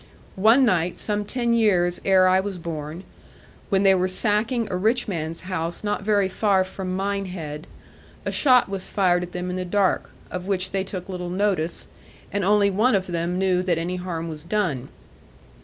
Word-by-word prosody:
One 230 +6 +6
night, 180 -5 +1
some 210 -1 -2
ten 235 +2 0
years 185 -6 +2
ere 190 -1 +5
I 185 0 +4
was 195 -1 -3
born, 165 0 -6 0.7
when 195 -1 +2
they 195 -1 +6
were 185 0 +2
sacking 215 +5 0
a - - -1
rich 225 +6 +1
man's 165 -4 -3
house 175 -2 -2
not 205 0 -1
very 205 -1 +2
far 190 0 +2
from 185 0 -5
Minehead, 185 -6 -4 0.6
a - - -1
shot 255 -4 +4
was 195 -1 -5
fired 180 -3 +2
at 180 0 -6
them 180 0 -4
in 180 - -3
the 185 - -2
dark, 190 +1 +1 0.2
of 180 0 -5
which 190 -2 -1
they 195 -1 0
took 185 -1 -7
little 180 -2 -5
notice, 180 -3 0 0.5
and 200 -1 0
only 200 +1 +4
one 215 +5 +3
of 190 -1 0
them 175 0 -2
knew 185 -1 +2
that 180 -2 0
any 175 +2 -2
harm 170 -2 -4
was 155 -2 -7
done. 170 -9 -1
185 Hz, 185 wpm, -24 LUFS, 175-205 Hz, 0.7 s, One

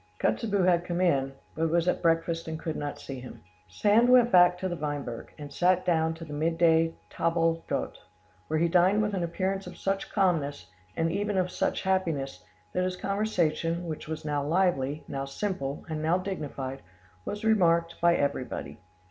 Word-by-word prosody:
Kotzebue 205 -4 +1
had 175 -1 +3
come 175 0 -3
in, 140 -7 +2 0.2
but 160 +1 0
was 170 +1 +1
at - - +1
breakfast 165 0 +1
and 160 0 -3
could 160 -1 -4
not 145 -1 -4
see 135 -2 -7
him. 125 - -11 0.2
Sand 210 - +3
went 245 -1 +6
back 180 0 +6
to 185 - -2
the 175 - -3
Weinberg, 145 -6 -5
and 145 -2 -9
sat 180 +3 +2
down 160 -2 +2
to 165 0 -9
the 150 - -8
midday 165 +1 +2 0.2
table 165 0 +1
d'hote, - - -3 0.5
where 155 - 0
he 170 +2 +3
dined 185 +5 +4
with 210 -1 -1
an 190 - -1
appearance 190 +3 -2
of 180 - -9
such 195 0 -2
calmness, 145 - 0 0.3
and 165 0 +1
even 205 +2 -1
of 180 -1 +1
such - - -1
happiness, 160 - -1 0.3
that 180 - +1
his 185 0 -1
conversation, 175 -5 -1
which 155 -2 -6
was 160 -1 -5
now 145 -1 -1
lively, 155 -3 +1
now 135 0 -3
simple, 140 -2 -4
and 155 -2 -3
now 160 +3 +2
dignified, 145 -8 -5 0.4
was 210 - -5
remarked 170 -6 +2
by 170 0 +5
everybody. 140 -3 -2
165 Hz, 180 wpm, -28 LUFS, 150-185 Hz, 0.5 s, went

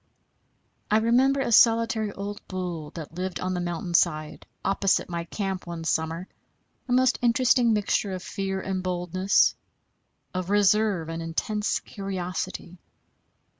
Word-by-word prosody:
I 215 - +4
remember 255 +5 +3
a 245 - -1
solitary 225 -1 +4
old 200 +1 -6
bull 175 -5 -4
that 160 -2 -7
lived 185 +1 -4
on 185 0 -2
the 180 - -2
mountain 175 0 -4
side 155 -3 +1 0.2
opposite 195 -1 +1
my 170 0 -3
camp 190 -1 -4
one 170 -1 -5
summer, 160 +2 -1 0.6
a - - -5
most 255 0 +3
interesting 240 0 +4
mixture 205 -2 +1
of 185 0 -5
fear 195 -1 -3
and 190 -1 -3
boldness, 185 +1 +2 0.8
of 185 0 -3
reserve 205 -3 +3
and 165 0 -4
intense 210 +6 -1
curiosity. 185 -2 -5
190 Hz, 130 wpm, -26 LUFS, 175-215 Hz, 0.8 s, I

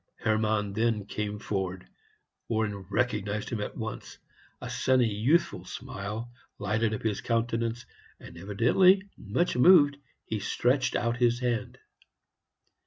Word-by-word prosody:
Hermann 110 -2 0
then 110 -2 0
came 105 0 -4
forward. 95 -3 -4 0.6
Warren 110 -2 0
recognized 105 -2 -1
him 115 -3 -3
at - - -5
once; 110 -1 -6 0.4
a - - -7
sunny, 130 -2 +2
youthful 140 +12 +1
smile 105 +5 -6 0.3
lighted 110 +2 0
up - - -7
his 110 -3 -1
countenance, 115 0 -1 0.3
and, - - -12
evidently 120 - +3
much 110 - -1
moved, 145 0 +6 0.3
he 110 - -3
stretched 125 +6 +1
out 115 0 0
his 120 -1 +2
hand. 120 -3 -2
110 Hz, 120 wpm, -28 LUFS, 105-120 Hz, 0.6 s, moved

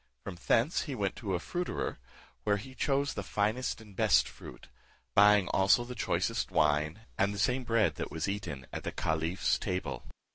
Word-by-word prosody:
From 95 - -6
thence 120 +9 +3
he 135 - -2
went 100 -4 -1
to 100 -6 -2
a - - -1
fruiterer, 175 - -3 0.4
where 100 +6 +2
he 130 +6 -9
chose 140 +2 0
the - - -3
finest 110 +6 -1
and 105 -3 -14
best - - +4
fruit; - - -12 0.5
buying 105 0 +6
also 95 +5 +4
the 125 +1 -7
choicest 120 - -1
wine, 75 +5 +1 0.2
and 100 +1 +3
the 100 - -5
same 125 +6 +1
bread 110 - +2
that - - -3
was 80 +3 -3
eaten 100 -10 -4
at - - -4
the - - -3
caliph's 80 +3 0
table. 80 -9 -3
100 Hz, 180 wpm, -31 LUFS, 90-120 Hz, 0.5 s, buying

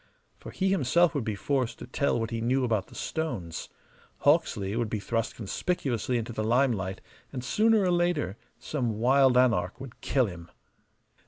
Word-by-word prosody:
For - - -9
he 190 0 0
himself 170 -1 +3
would 140 - -1
be 110 -2 -2
forced 130 +3 -1
to - - -8
tell 140 -4 0
what 115 +1 -3
he 115 -1 -2
knew 130 +3 +1
about 110 -5 0
the - - -15
stones: 120 - -4 0.5
Hawksley 100 +1 +2
would 115 -2 -1
be 110 - -2
thrust 115 +2 -2
conspicuously 120 - -1
into 115 0 -4
the 110 - -2
limelight, 110 -5 +1 0.3
and 125 -3 -5
sooner 220 - +3
or 180 - +2
later 175 - +1 0.2
some 120 -8 -2
wild 130 +2 +4
anarch 115 -6 +2
would 130 -3 -10
kill 130 -2 +2
him. 85 -4 -8
120 Hz, 170 wpm, -28 LUFS, 110-140 Hz, 0.5 s, wild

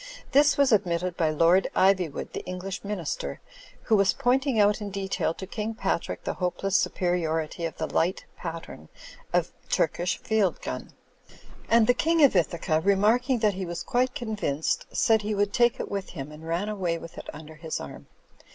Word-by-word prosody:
This 290 +1 +5
was 280 -2 +4
admitted 180 -4 +1
by 160 -3 +1
Lord 170 +5 +4
Ivywood, 185 -5 +2
the - - -5
English 185 +1 -5
Minister, 175 - -4 0.4
who 220 - +3
was 195 -2 +4
pointing 260 -1 +1
out 205 +1 +4
in 205 - -4
detail 195 -3 -1
to 190 - -7
King 215 +3 -4
Patrick 190 -5 -2
the - - -2
hopeless 185 +2 -2
superiority 165 -3 0
of 165 - -5
the 160 - -1
light 175 +4 0
pattern 165 - -8 0.4
of - - +1 0.2
Turkish 175 +1 0
field 215 -5 0
gun; - - -5 0.8
and 230 -1 +5
the 245 - +5
King 325 +3 +2
of 275 - +6
Ithaca, 170 -2 +1
remarking 215 - +3
that 210 - +3
he 190 +1 -4
was 170 0 -4
quite 250 +1 0
convinced, 210 - -2
said 220 -1 +3
he 210 0 -2
would 205 0 0
take 240 -1 +3
it - - -5
with 200 -1 -3
him, 135 +2 -7
and 155 +2 -11
ran 170 +5 -1
away 185 -6 -1
with 165 0 -10
it - - -9
under 155 +1 -11
his 160 0 -5
arm. - - -9
190 Hz, 180 wpm, -26 LUFS, 165-215 Hz, 0.8 s, of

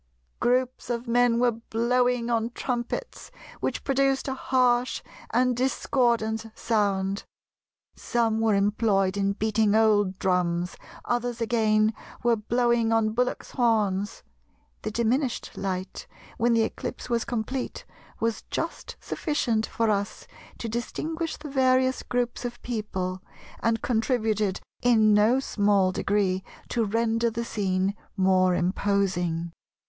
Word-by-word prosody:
Groups 250 +1 0
of 240 0 -2
men 240 0 +3
were 245 0 +3
blowing 240 +1 0
on 230 0 +1
trumpets, 240 -2 -4 0.3
which - - -2
produced 275 0 +1
a 265 - -1
harsh 250 -2 +1 0.3
and 250 +1 +2
discordant 235 -3 +1
sound; 200 -3 0 0.7
some 225 -2 0
were 220 -2 +3
employed 200 -1 +2
in 200 0 +1
beating 215 0 +1
old 205 -4 +3
drums, 180 -2 0 0.3
others 245 -1 -1
again 220 -2 +2 0.3
were 240 -1 +4
blowing 235 +1 +1
on 225 -1 +2
bullocks' 250 +3 -1
horns.... 210 -5 +1 0.6
The - - -3
diminished 235 +4 0
light, 190 -1 -4 0.3
when 240 0 +3
the 230 -1 +4
eclipse - - -5
was 235 -2 0
complete, 240 +2 -4 0.3
was 230 -1 -1
just - - -4
sufficient 235 -8 -1
for 225 -1 +1
us 205 0 -2 0.3
to 230 - -5
distinguish 320 +8 -3
the 300 - -8
various 260 -1 +3
groups 245 -1 -2
of 240 0 -5
people, 190 -6 -3 0.4
and 225 -1 0
contributed 220 -4 0 0.2
in 220 -3 +5
no 215 +5 +4
small 200 -6 +2
degree 190 -1 0 0.3
to 230 -2 +1
render 230 +2 +1
the 235 +1 -4
scene 190 -2 0 0.2
more 185 -1 +4
imposing. 180 -3 0
225 Hz, 120 wpm, -26 LUFS, 205-245 Hz, 0.7 s, in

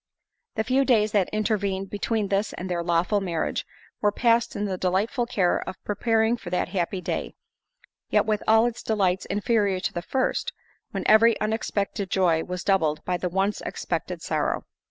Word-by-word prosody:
The 220 - 0
few 260 +4 +2
days 220 -5 +3
that 200 -4 +2
intervened 200 -3 -1
between 210 0 -1
this 200 +2 0
and 185 - -5
their 175 -2 -1
lawful 175 +4 +1
marriage, 170 -4 -2 0.3
were 205 - +3
passed 235 +2 +2
in 205 - -1
the 190 -2 -2
delightful 195 +7 0
care 190 -7 +1
of - - -6
preparing 225 +2 +1
for 175 - -8
that 180 0 -1
happy 185 0 -2
day—yet, - - -4
with 215 -2 0
all 220 +1 +6
its 240 -1 -2
delights 190 -4 +1
inferior 205 -2 +1
to - - -2
the 175 - -3
first, 260 +8 -1 0.4
when - - -4
every 225 +1 +5
unexpected 210 -2 -2
joy 170 -4 +2
was 180 -1 -5
doubled 160 -6 +1
by 180 -1 0
the 180 - -2
once 195 +3 0
expected - - -4
sorrow. - - -1
200 Hz, 170 wpm, -25 LUFS, 185-220 Hz, 0.4 s, all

